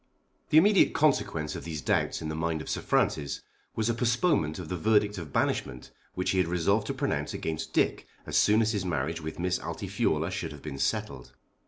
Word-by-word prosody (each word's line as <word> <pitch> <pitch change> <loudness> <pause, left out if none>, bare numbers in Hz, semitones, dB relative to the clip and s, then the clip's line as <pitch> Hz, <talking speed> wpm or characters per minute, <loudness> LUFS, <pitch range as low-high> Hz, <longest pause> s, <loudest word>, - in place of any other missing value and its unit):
The 155 - +5
immediate 200 +4 +5
consequence 85 - +1
of - - -6
these 80 -3 -5
doubts 70 - 0
in 80 - -3
the - - -3
mind 80 0 -1
of - - -9
Sir - - -2
Francis 70 -1 0 0.3
was 110 0 0
a 115 - +2
postponement 120 - +1
of 90 - -6
the 90 - -3
verdict 105 +1 +2
of 80 -5 -8
banishment 65 -2 -1 0.2
which 90 - 0
he 95 - +1
had 90 - +2
resolved 95 +5 +1
to - - -1
pronounce - - -2
against 80 -1 -4
Dick - - +1 0.2
as - - -4
soon 110 +2 +5
as 110 - +1
his 105 -4 -1
marriage 80 -1 -2
with 80 0 -6
Miss 90 +1 0
Altifiorla 90 -2 -1
should 85 -4 -4
have 75 - -12
been 70 -3 -6
settled. - - -2
90 Hz, 205 wpm, -28 LUFS, 80-105 Hz, 0.3 s, The